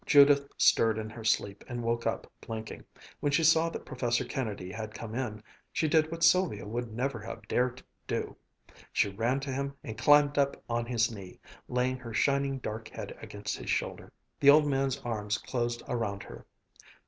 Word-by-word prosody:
Judith 140 Hz, -1 st, +6 dB
stirred 110 Hz, -1 st, +4 dB
in 110 Hz, 0 st, -4 dB
her 115 Hz, 0 st, -9 dB
sleep 100 Hz, -2 st, 0 dB
and 120 Hz, -2 st, -4 dB
woke 115 Hz, 0 st, 0 dB
up 115 Hz, -, -1 dB, 0.2 s
blinking. 110 Hz, -1 st, -6 dB, 0.4 s
When 145 Hz, -, 0 dB
she 165 Hz, +3 st, +3 dB
saw 165 Hz, +1 st, +5 dB
that -, -, -7 dB
Professor 120 Hz, -2 st, 0 dB
Kennedy 105 Hz, -8 st, -4 dB
had 110 Hz, +1 st, -6 dB
come 110 Hz, -1 st, -7 dB
in, 110 Hz, -4 st, -3 dB, 0.3 s
she 160 Hz, -, +1 dB
did 155 Hz, 0 st, +3 dB
what 165 Hz, 0 st, -4 dB
Sylvia 180 Hz, -, +4 dB
would 120 Hz, +2 st, -4 dB
never 125 Hz, +2 st, -2 dB
have 110 Hz, 0 st, -8 dB
dared 125 Hz, +2 st, 0 dB, 0.2 s
do; -, -, -2 dB, 0.6 s
she 100 Hz, -, +2 dB
ran 115 Hz, +7 st, 0 dB
to 135 Hz, 0 st, -4 dB
him 140 Hz, +1 st, -3 dB
and 110 Hz, -, -6 dB
climbed 145 Hz, +3 st, +5 dB
up 140 Hz, 0 st, +2 dB
on 115 Hz, 0 st, -1 dB
his 120 Hz, -1 st, +1 dB
knee, 95 Hz, -4 st, -10 dB, 0.3 s
laying 125 Hz, +1 st, 0 dB
her 115 Hz, -3 st, -8 dB
shining, 140 Hz, +2 st, +2 dB
dark 110 Hz, -3 st, -5 dB
head -, -, -7 dB
against 105 Hz, 0 st, -5 dB
his -, -, -7 dB
shoulder. -, -, -2 dB, 0.3 s
The 140 Hz, -, +6 dB
old 150 Hz, +1 st, +8 dB
man's 135 Hz, -2 st, +1 dB
arms 105 Hz, -2 st, -2 dB
closed 120 Hz, -2 st, -2 dB
around 110 Hz, -5 st, -2 dB
her. -, -, -11 dB
120 Hz, 185 wpm, -30 LUFS, 110-140 Hz, 0.6 s, old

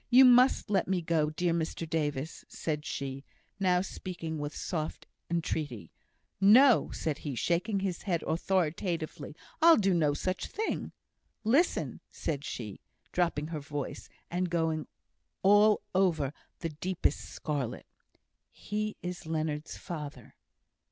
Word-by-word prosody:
"You 260 Hz, +2 st, +9 dB
must 250 Hz, -3 st, +5 dB
let 190 Hz, -3 st, +2 dB
me 185 Hz, -2 st, 0 dB
go, 160 Hz, -2 st, +2 dB
dear 170 Hz, +2 st, 0 dB
Mr 165 Hz, 0 st, -2 dB
Davis!" 150 Hz, -1 st, -2 dB
said 150 Hz, -2 st, -3 dB
she, 135 Hz, 0 st, -4 dB, 0.4 s
now 180 Hz, -2 st, +3 dB
speaking 170 Hz, -4 st, -5 dB
with 145 Hz, 0 st, -4 dB
soft 155 Hz, -3 st, -3 dB, 0.2 s
entreaty. 150 Hz, -, -2 dB, 0.5 s
"No!" 235 Hz, +6 st, +7 dB
said 155 Hz, -3 st, -3 dB
he, 145 Hz, -4 st, -4 dB
shaking 185 Hz, -, 0 dB
his 190 Hz, -3 st, -2 dB
head 175 Hz, -5 st, -1 dB
authoritatively. 170 Hz, -2 st, -1 dB, 0.3 s
"I'll 330 Hz, 0 st, +8 dB
do 195 Hz, -3 st, +3 dB
no 150 Hz, -4 st, +2 dB
such 185 Hz, +5 st, -2 dB
thing." 440 Hz, +2 st, -3 dB, 0.5 s
"Listen," 270 Hz, +11 st, +2 dB
said 145 Hz, -3 st, -3 dB
she, 110 Hz, -8 st, -6 dB, 0.3 s
dropping 160 Hz, -4 st, 0 dB
her 160 Hz, -2 st, -3 dB
voice, 145 Hz, -1 st, -5 dB, 0.2 s
and 180 Hz, +1 st, 0 dB
going 160 Hz, -2 st, 0 dB, 0.6 s
all 205 Hz, +2 st, +6 dB
over 170 Hz, -7 st, +2 dB, 0.3 s
the 165 Hz, -, -1 dB
deepest 175 Hz, +4 st, -1 dB
scarlet; 140 Hz, -6 st, -4 dB, 0.6 s
"he 215 Hz, 0 st, -4 dB
is 180 Hz, -2 st, -5 dB
Leonard's 155 Hz, -1 st, -2 dB
father! 145 Hz, -8 st, -7 dB
170 Hz, 125 wpm, -30 LUFS, 150-190 Hz, 0.6 s, You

